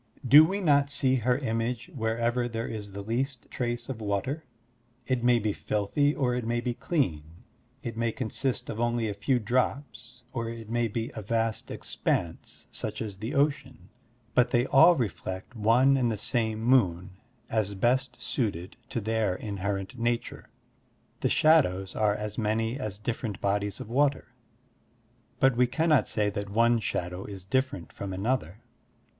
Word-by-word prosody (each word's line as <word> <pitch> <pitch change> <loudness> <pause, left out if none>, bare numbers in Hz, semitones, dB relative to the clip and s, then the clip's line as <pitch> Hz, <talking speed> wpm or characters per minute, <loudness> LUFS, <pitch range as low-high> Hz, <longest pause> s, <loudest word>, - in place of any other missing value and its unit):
Do 145 +6 +10
we 195 +5 0
not 145 -5 +4
see 130 -2 +2
her 125 +1 +2
image 120 +3 -2
wherever 120 0 0
there 115 -1 -3
is 105 -3 -6
the 100 0 -6
least 125 +4 -2
trace 120 -1 -3
of 125 -4 -5
water? 105 +10 -2 0.6
It 130 -2 0
may 120 0 +5
be 105 -2 0
filthy, 125 +11 0
or 125 -3 +1
it 125 0 -1
may 120 +1 0
be 120 0 -2
clean; 120 - -1 0.6
it 115 -4 -4
may 115 0 0
consist 130 +2 -2
of 110 - -6
only 120 -1 +1
a 105 - -2
few 110 +6 +1
drops, 125 +1 -2
or 115 -2 -2
it 115 -1 -8
may 120 0 +1
be 115 +2 -3
a 110 - -6
vast 115 +1 -1
expanse, - - -3
such - - -4
as 105 -3 -5
the 110 +4 -4
Ocean; 135 -8 0 0.4
but 125 -1 +4
they 120 0 +2
all 160 +6 +7
reflect 105 - -4
one 120 +5 +4
and 125 -3 +2
the 110 - -2
same 110 0 -1
moon 95 -8 +3 0.4
as 105 -3 -1
best 125 +6 +1
suited 100 -6 -2
to 115 - -2
their 110 -3 0
inherent 100 +3 -4
nature. 120 0 -2 0.7
The - - +1
shadows 95 - +3
are 105 -2 +2
as 105 +1 -4
many 110 +2 0
as 110 -5 -4
different 110 -1 -4
bodies 100 0 -1
of - - -7
water, 140 +2 +1 1.1
but 135 -2 +4
we 125 +1 +4
cannot 155 +2 +2
say 105 -2 0
that 100 0 -4
one 115 +3 +3
shadow 90 -3 -3
is 95 -3 -8
different 130 -5 -1
from 100 -1 -5
another. 100 -2 -2
115 Hz, 160 wpm, -28 LUFS, 105-130 Hz, 1.1 s, Do